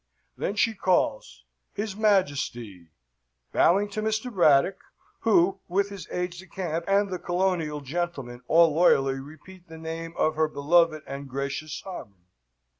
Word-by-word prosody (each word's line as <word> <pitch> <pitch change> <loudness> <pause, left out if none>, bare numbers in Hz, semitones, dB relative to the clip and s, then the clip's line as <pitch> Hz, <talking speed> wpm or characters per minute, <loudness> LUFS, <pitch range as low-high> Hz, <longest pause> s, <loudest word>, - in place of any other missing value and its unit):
Then 200 - -3
she 220 +2 +2
calls, 110 - 0 0.3
"His 205 -1 -3
Majesty," 145 - 0 0.6
bowing 195 +4 +3
to 215 +1 -4
Mr. 220 +3 -2
Braddock, 175 +1 +4 0.4
who 360 +2 +3
with 200 +3 0
his 200 -2 -8
aides 180 -1 -3
de 190 - -12
camp 170 -2 -4
and 200 0 +2
the 185 - -3
colonial 175 -5 -1
gentlemen 140 -5 -4
all 165 -1 +5
loyally 135 -5 +3
repeat 160 +6 -13
the 160 0 -11
name 165 +1 -6
of 155 0 +1
their 155 0 +3
beloved 155 +1 +2
and 140 0 -7
gracious 140 +3 -4
Sovereign. 100 - -10
170 Hz, 140 wpm, -26 LUFS, 140-190 Hz, 0.6 s, all